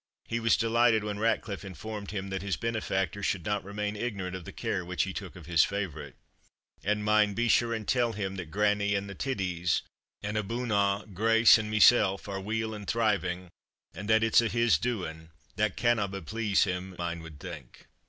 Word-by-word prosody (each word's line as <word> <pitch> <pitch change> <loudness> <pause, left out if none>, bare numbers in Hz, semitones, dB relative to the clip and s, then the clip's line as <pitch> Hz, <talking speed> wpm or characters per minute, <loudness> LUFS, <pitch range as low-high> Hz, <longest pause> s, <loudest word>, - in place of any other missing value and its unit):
He 120 - -1
was 115 -1 +3
delighted 115 -1 +3
when 105 -1 -4
Ratcliffe 110 -3 -1
informed 100 +3 -7
him 100 -1 -4
that 95 -2 -2
his 100 -1 -2
benefactor 100 -5 -2
should 95 -3 -1
not 105 0 -1
remain 105 +2 -3
ignorant 100 -5 -3
of 90 -3 -8
the - - -7
care 90 - -2
which 90 -2 -1
he - - -4
took - - -7
of - - -11
his 85 -3 +4
favourite. 100 -6 -4 0.7
"And 105 +1 0
mind 105 -1 +3
be 120 +1 +1
sure 120 0 +3
and 110 -3 -3
tell 120 -2 +2
him 95 -2 -3
that 90 -4 -6
grannie 105 +1 +1
and 100 0 -2
the 100 - -7
titties, 90 -8 -1 0.4
and, 105 +1 -2
abune 115 +3 -2
a', 100 0 +2
Grace 115 +3 +6
and 105 0 -4
mysell, 105 -2 +5
are 95 -1 -4
weel 110 +2 -2
and 105 -1 -8
thriving, 95 -6 0 0.4
and 100 +5 -7
that 110 0 +5
it's 115 +1 +5
a' 115 - 0
his 115 -7 +3
doing 85 -9 -4 0.3
that 105 -2 0
canna 120 -4 +2
but 95 -3 -7
please 110 0 +1
him, 90 -1 -3
ane 85 -1 -3
wad 80 -3 -11
think." 80 -7 -10
100 Hz, 195 wpm, -29 LUFS, 95-110 Hz, 0.7 s, Grace